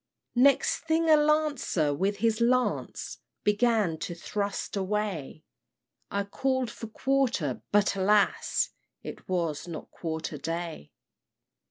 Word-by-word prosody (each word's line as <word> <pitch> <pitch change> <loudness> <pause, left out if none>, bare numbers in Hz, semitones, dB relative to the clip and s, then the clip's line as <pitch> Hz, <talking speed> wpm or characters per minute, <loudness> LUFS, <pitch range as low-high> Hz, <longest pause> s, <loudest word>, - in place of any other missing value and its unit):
"Next 270 +3 +4
thing 320 0 +2
a - - +9
lancer, 300 - +2
with 195 +7 0
his 225 +2 +1
lance, 250 +2 0 0.2
Began 210 -6 +2
to 175 - -4
thrust 200 +4 -3
away; 195 -7 -2 0.7
I 200 0 -1
call'd 260 +3 -1
for 225 - -8
quarter, 240 - 0
but, 205 -1 +3
alas! 200 +1 +2 0.3
It - - -9
was 170 -4 -1
not 165 -2 -7
Quarter 160 -2 -4
day. 165 - -5
205 Hz, 115 wpm, -28 LUFS, 170-250 Hz, 0.7 s, a